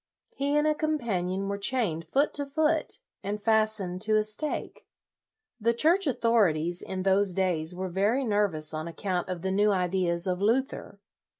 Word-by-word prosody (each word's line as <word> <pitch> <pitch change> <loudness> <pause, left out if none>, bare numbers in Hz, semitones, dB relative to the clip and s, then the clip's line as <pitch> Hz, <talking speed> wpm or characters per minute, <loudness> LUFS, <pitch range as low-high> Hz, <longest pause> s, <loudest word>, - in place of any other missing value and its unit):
He 285 +2 0
and 295 - +2
a 305 - +3
companion 200 - -2
were 200 0 -3
chained 200 -8 -1
foot 280 +3 +1
to 285 -1 -3
foot, 310 +2 0 0.2
and 205 +1 -3
fastened 215 -4 +1
to 215 0 +2
a 215 - +2
stake. 215 +8 -4 0.7
The 230 +1 +1
Church 335 +8 +3
authorities, 180 - +1
in 185 -1 -5
those 195 -1 +2
days, 180 -3 0
were 185 +1 -3
very 205 +9 +1
nervous 205 -9 0
on 155 +1 -4
account 180 +1 -3
of 180 -1 -5
the 190 - -1
new 205 +2 +3
ideas 180 -2 +1
of 180 0 -1
Luther. 230 -2 -1
200 Hz, 165 wpm, -27 LUFS, 180-235 Hz, 0.7 s, a